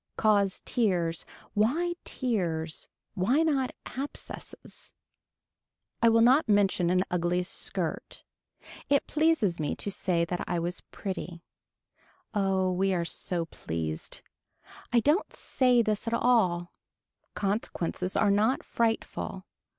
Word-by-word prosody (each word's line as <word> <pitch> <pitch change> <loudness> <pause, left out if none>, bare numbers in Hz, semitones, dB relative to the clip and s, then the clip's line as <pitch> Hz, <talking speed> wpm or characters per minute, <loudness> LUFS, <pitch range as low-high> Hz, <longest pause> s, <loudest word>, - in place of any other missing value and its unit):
Cause 200 -3 +2
tears. 180 -8 0 0.3
Why 300 +12 +2
tears, 170 - -2 0.3
why 240 - +2
not 275 -5 +1 0.2
abscesses. 275 +3 -6 1.1
I 230 - +6
will 230 0 +5
never 255 +6 +6
mention 195 -4 +3
an 185 +1 +3
ugly 180 0 +1
skirt. 180 - -4 0.7
It 280 -1 +3
pleased 300 - +2
me 150 -2 -1
to 200 - -2
say 175 -3 +1
that 175 +1 -3
I 175 - 0
was 175 +1 -2
pretty. 180 -3 -5 0.9
Oh 190 -2 +1
we 190 +1 +1
are 170 -1 0
so 170 0 -2
pleased. 80 - -5 0.7
I 240 -1 +4
don't 300 - +2
say 250 -3 +3
this 215 0 -1
at 230 - +1
all. 185 -9 +2 0.6
Consequences 195 -3 -2
are 205 -2 +4
not 215 +6 +2
frightful. 225 -4 -2
200 Hz, 115 wpm, -29 LUFS, 175-235 Hz, 1.1 s, I